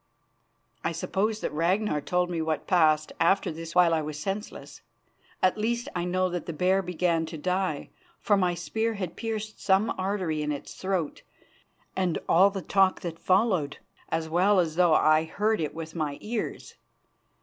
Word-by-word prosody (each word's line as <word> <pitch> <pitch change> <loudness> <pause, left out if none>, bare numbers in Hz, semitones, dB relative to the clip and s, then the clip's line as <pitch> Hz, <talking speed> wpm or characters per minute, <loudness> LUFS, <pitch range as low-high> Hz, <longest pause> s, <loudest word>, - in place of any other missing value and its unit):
I - - -1
suppose 215 +3 -1
that - - -3
Ragnar 170 +1 +1
told 180 +3 0
me 165 -2 -1
what 160 -2 -2
passed 155 -4 +3
after 175 +3 +3
this 165 +1 -8
while 175 -2 +5
I 160 - +2
was 150 -1 -5
senseless. 195 +7 -6 0.6
At 185 +3 +3
least, 235 +2 -1
I 175 0 -1
know 185 +1 +1
that 175 -1 -4
the 170 - -3
bear 185 +5 +2
began 170 -2 0
to 160 - -7
die, 180 -1 -2 0.3
for 210 - +2
my 180 -3 +1
spear 220 +6 -2
had 185 -4 -5
pierced 215 -2 -5
some 195 +3 +2
artery 185 -5 -1
in 150 0 -1
its 145 - -6
throat, 185 -5 -2 0.7
and 185 -3 0
all 190 +4 +6
the 195 -2 -5
talk 195 -1 +2
which 165 -2 -5
followed, 185 -7 +1 0.3
as 160 0 -1
well 185 +5 +3
as 160 -3 0
though 175 -2 +4
I 155 +1 +4
heard 210 +4 0
it 150 -1 -3
with 160 -1 -6
my 150 -4 -2
ears. 225 +1 -4
180 Hz, 170 wpm, -27 LUFS, 160-195 Hz, 0.7 s, all